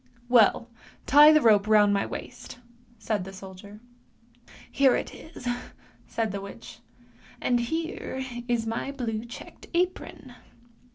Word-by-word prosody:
" - - -33
" - - -30
Well! 230 +1 +4 0.4
tie 295 +2 +8
the 305 -1 +5
rope 210 -2 +5
round 210 -1 +5
my 200 - 0
waist! - - -8 0.2
" 240 -1 -30
said 210 -4 0
the 190 - -9
soldier. 195 +2 -12 0.5
" 240 +1 -32 0.3
Here 270 -2 +4
it - - -4
is," 315 -5 -10 0.6
said 225 -3 -2
the 200 0 -5
witch, 200 0 -11 0.3
" - - -26
and 245 -1 +1
here 315 0 -4 0.2
is 240 -2 0
my 230 +4 -3
blue 230 -5 -4
checked 240 - -11
apron." 355 -7 -2
235 Hz, 155 wpm, -26 LUFS, 210-265 Hz, 0.6 s, tie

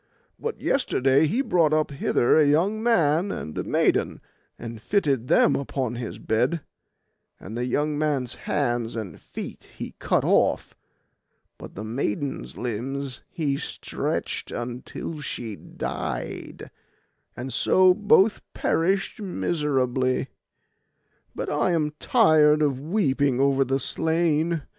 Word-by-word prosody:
But 460 +1 -4
yesterday 140 - +2
he 240 - 0
brought 165 - +3
up 155 -1 +1
hither 135 -3 +2
a 155 - +6
young 185 +9 +2
man 185 -5 +2
and 75 - -6
a - - -2
maiden, - - +1 0.4
and 115 -2 -8
fitted 140 - +1
them - - +4
upon 130 -3 -2
his 120 -2 -5
bed; 125 +9 0 0.8
and 105 +4 -8
the 120 +1 -1
young 150 +3 0
man's 140 -6 0 0.2
hands 120 -5 0
and 105 -8 -6
feet - - -8
he - - -6
cut - - +1
off, - - +2 0.8
but - - -10
the 105 - -5
maiden's 120 +3 -3
limbs 130 +3 -4
he 145 -5 -1
stretched - - -4
until 125 +5 -5
she 115 -6 -5
died, - - -5 0.7
and 125 +1 -5
so 185 +8 +5
both 210 +1 +4
perished 195 +5 0
miserably—but 135 -9 0 1.2
I 180 - +1
am 155 -2 0
tired 155 -1 +4
of 140 -3 +1
weeping 145 - +1
over 135 0 +3
the 135 +1 0
slain. 160 +2 0
145 Hz, 120 wpm, -25 LUFS, 125-165 Hz, 1.2 s, a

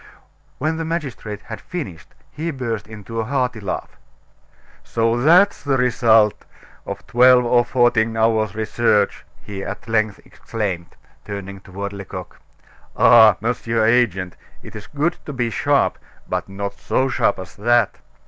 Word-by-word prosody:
When 160 +1 -1
the 165 - -2
magistrate 135 - -4
had 110 -2 -8
finished, 135 - -7 0.2
he 160 +3 -4
burst 115 -8 -4
into 110 +1 -7
a - - 0
hearty 125 -1 -1
laugh. 100 -3 -5 0.9
"So 115 +1 0
that's 175 +8 +5
the 140 -2 0
result 115 -4 +3 0.4
of - - -6
twelve 125 +1 +5
or 120 0 +4
fourteen 120 -3 +2
hours' 110 -2 +1
research," 110 -1 +1 0.2
he 100 -1 -6
at 120 - -7
length 110 -3 0
exclaimed, 95 -6 -5 0.3
turning 100 -1 -7
toward 100 +1 -6
Lecoq. 95 -2 -8 0.6
"Ah! 110 -4 +7
Mr. 115 -1 0
Agent, 100 -7 +1 0.3
it's 105 -1 -10
good 155 +4 -1
to 145 - -5
be 120 -3 -1
sharp, - - +1 0.3
but - - -3
not 100 +1 -4
so 130 - 0
sharp 135 - +1
as 95 -1 -9
that. 120 +3 +2
115 Hz, 140 wpm, -20 LUFS, 105-125 Hz, 0.9 s, Ah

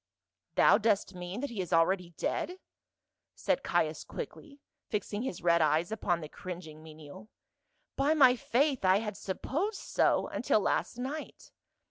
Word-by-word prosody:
"Thou - - +6
dost 210 -3 +1
mean 180 +5 -6
that 285 - -3
he 215 -5 -3
is 180 - -6
already 175 +2 +2
dead?" 360 - -2 0.8
said - - 0
Caius - - 0
quickly, 285 -1 -8 0.3
fixing 210 0 -2
his 235 -10 -5
red 170 -1 +4
eyes 155 +4 +2
upon 175 -6 -1
the 155 - -6
cringing 165 -3 -8
menial. 155 +5 -12 0.3
" - - -47
By 285 +3 +3
my 260 -4 +7
faith, 260 +2 +1
I 185 +1 +5
had 210 -1 -3
supposed 300 - -3
so, - - +2
until - - +1
last - - -1
night. 275 +5 -6
200 Hz, 150 wpm, -31 LUFS, 175-255 Hz, 0.8 s, my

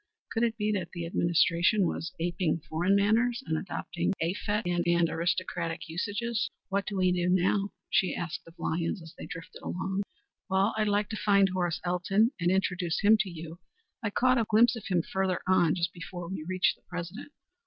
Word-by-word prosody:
Could 225 - -1
it 230 -1 +1
be 210 -1 0
that 185 -5 -3
the 170 -2 -4
administration 170 +3 +3
was 165 - -2
aping 170 -1 0
foreign 175 +5 +2
manners 230 +5 +2
and 160 - -1
adopting 175 +1 -2
effete 205 +5 -1
and 175 -1 +2
aristocratic 170 -1 -2
usages? 215 +7 -2 0.2
"What 200 0 -1
do 205 - -3
we 185 -1 +3
do 180 0 +1
now?" 190 +2 +2 0.2
she 185 - +2
asked 170 -2 -4
of 165 - -15
Lyons 165 +2 -2
as 160 - -12
they - - -8
drifted 165 0 -9
along. 190 +2 -2 0.5
"I'd 205 +3 +2
like 205 0 +1
to 220 - -4
find 200 -2 +4
Horace 175 -2 -1
Elton 195 +6 +2
and 175 0 +2
introduce 180 -2 0
him 215 +1 +7
to 210 -3 0
you. 165 0 -8 0.4
I 215 - -1
caught 255 +4 +3
a 225 - +1
glimpse 235 +3 +5
of 230 - -7
him 175 -3 +1
further 190 -1 -1
on 180 -3 +4
just 175 0 -1
before 175 0 -7
we 185 -2 -4
reached 185 0 +2
the - - -33
President. 180 - -6
185 Hz, 185 wpm, -29 LUFS, 170-205 Hz, 0.5 s, him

